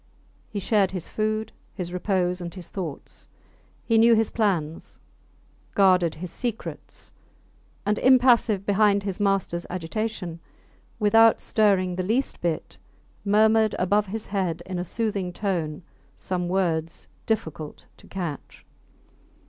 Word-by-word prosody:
He 205 - -4
shared 200 -1 +2
his 185 -3 -6
food, 215 0 -2 0.2
his 180 -2 -5
repose, 180 -1 0
and 170 -1 -5
his 175 -3 -9
thoughts; 170 -8 -7 0.6
he 225 -1 +3
knew 230 +1 +6
his 225 -1 +1
plans, 175 -8 -1 0.8
guarded 180 -4 +4
his 170 +2 -7
secrets; 240 -3 -6 0.7
and, 210 +1 +1
impassive 245 -6 +4
behind 205 0 +3
his 195 -1 -4
masters 195 -4 0
agitation, 180 0 -4 0.6
without 225 +1 +5
stirring 195 -4 +2
the 185 - -1
least 235 +8 -1
bit, 170 -2 -3 0.4
murmured 215 +1 +4
above 200 +3 +2
his 215 +3 -5
head 180 -4 -2
in 185 -1 -4
a 175 - -3
soothing 200 -3 -2
tone 175 -5 -2 0.3
some 180 -2 -3
words 170 -3 -1 0.2
difficult 160 -8 -3
to - - -18
catch. 170 -7 -6
195 Hz, 125 wpm, -25 LUFS, 175-215 Hz, 0.8 s, knew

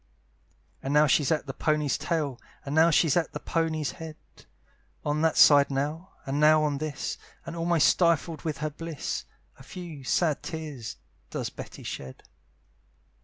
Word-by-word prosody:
And 135 +2 -2
now 150 +1 +7
she's 145 +1 +3
at 155 -2 +1
the 135 - -5
pony's 150 -2 +1
tail, 150 -7 -2 0.2
And 140 - -4
now 160 +2 +6
she's 160 -2 +3
at 175 -2 0
the - - -4
pony's 160 -3 -1
head, 160 -3 -8 0.9
On 150 +1 0
that 160 -1 +2
side 145 -1 +7
now, 150 +7 -3
and 135 +2 -1
now 155 0 +6
on 145 -2 0
this, 155 -1 -4 0.3
And 165 - -6
almost 170 -1 +3
stifled 170 -2 +2
with 155 -4 -3
her 155 - -2
bliss, 165 -1 -5 0.3
A - - -12
few 170 -6 -9
sad 155 +3 +1
tears 150 -9 -6 0.3
does - - -4
Betty - - -9
shed. 65 -1 -7
155 Hz, 160 wpm, -27 LUFS, 145-165 Hz, 0.9 s, now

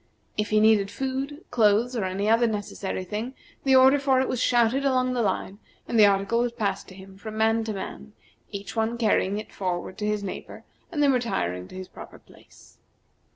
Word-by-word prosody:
If 210 0 -1
he 215 - +3
needed 215 -2 +4
food, 270 +5 -4
clothes, 230 +1 +3
or 215 -5 -1
any 190 +2 -2
other 230 +2 +4
necessary 205 -3 -4
thing, 215 +7 -5 0.3
the 270 -1 +4
order 265 +2 +6
for 270 -2 +3
it 260 - +1
was 255 - -2
shouted 240 +2 +3
along 255 -2 +2
the 245 - 0
line, 200 -1 -2 0.3
and 230 - +1
the 210 - +9
article 200 +3 +1
was 240 0 +1
passed 200 -4 -2
to 185 - -12
him 190 0 -13
from 215 0 -7
man 225 +1 +2
to 220 - -3
man, 70 - -7 0.4
each 200 +2 -7
one 225 +1 0
carrying 205 -3 +1
it 215 - -7
forward 185 +1 -3
to 210 - -1
his 210 -1 -1
neighbor, 190 - -7 0.3
and 295 -2 0
then 280 - +5
retiring 90 - -1
to - - -13
his 185 0 -7
proper - - -12
place. - - -20
220 Hz, 200 wpm, -25 LUFS, 200-245 Hz, 0.4 s, the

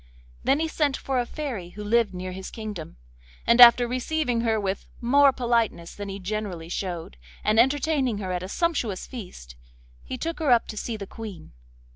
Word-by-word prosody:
Then 275 - +3
he 320 - 0
sent 295 -4 0
for 265 -2 -1
a 240 - -1
fairy 245 - -5
who 210 - -5
lived 230 +1 +2
near 185 0 -5
his 190 +1 -7
kingdom, 210 - -7 0.5
and 235 +1 +5
after 240 0 +9
receiving 250 0 -1
her 225 -2 +1
with 195 -1 -3
more 275 +4 +5
politeness 235 -9 0
than 205 -1 -6
he 195 - -5
generally 190 -4 -4
showed, 175 - -4 0.3
and 215 +1 +3
entertaining 270 -2 +2
her 190 -2 -4
at 180 -1 -2
a 185 - -6
sumptuous 250 - -1
feast, 180 - -9 0.5
he 255 - -5
took 330 +5 -4
her 310 -3 0
up 240 -2 +4
to - - -5
see 220 +1 -4
the 200 - -6
Queen. 210 -3 -9
225 Hz, 185 wpm, -25 LUFS, 190-255 Hz, 0.5 s, after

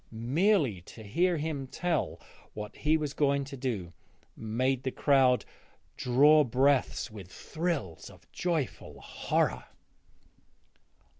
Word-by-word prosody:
Merely 130 - +1
to 110 - -11
hear 170 - +1
him 145 -3 -3
tell 170 +2 -2 0.4
what 105 0 -7
he 155 +1 +2
was 150 -2 -3
going 140 -1 +1
to 140 +1 -8
do 110 -10 -4 0.4
made 125 +4 -1
the 130 - -2
crowd 130 -2 +3 0.5
draw 145 +5 +5
breath 130 0 +1
with 100 -4 -10
thrills 155 - -4
of - - -17
joyful 165 -7 -3
horror. - - -1
135 Hz, 115 wpm, -29 LUFS, 120-155 Hz, 0.5 s, draw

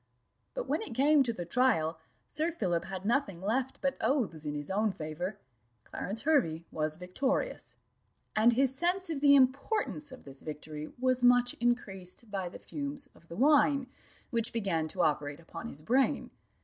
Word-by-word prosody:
But - - -3
when - - 0
it 265 - -6
came 290 +3 +5
to 245 -3 +2
the 180 -6 -5
trial, 170 -7 +2 0.3
Sir 320 +2 0
Philip 175 - -1
had 190 0 -6
nothing 220 -6 +1
left 245 +7 -1
but 275 -1 0
oaths 205 - 0
in 150 0 -2
his 145 +3 -5
own 210 +2 +2
favour. 175 +4 -5 0.5
Clarence 205 - -5
Hervey 200 - +2
was 155 0 -1
victorious; 265 - -2 0.6
and 225 +3 +5
his 265 +2 +3
sense 350 +5 0
of 285 -4 -3
the 285 -1 +7
importance 280 - +1
of 260 - -11
this 135 -1 -12
victory 150 0 -7
was 255 0 +1
much 245 0 +5
increased 215 -3 -2
by 190 -3 -2
the - - -9
fumes 285 -1 -6
of 170 - -21
the 170 - -8
wine, 285 +1 +4 0.5
which 230 -2 +1
began 190 -8 0
to 180 +2 -1
operate 145 -1 0
upon 170 +6 -8
his 150 -8 -7
brain. 255 +8 +2
230 Hz, 170 wpm, -31 LUFS, 170-275 Hz, 0.6 s, the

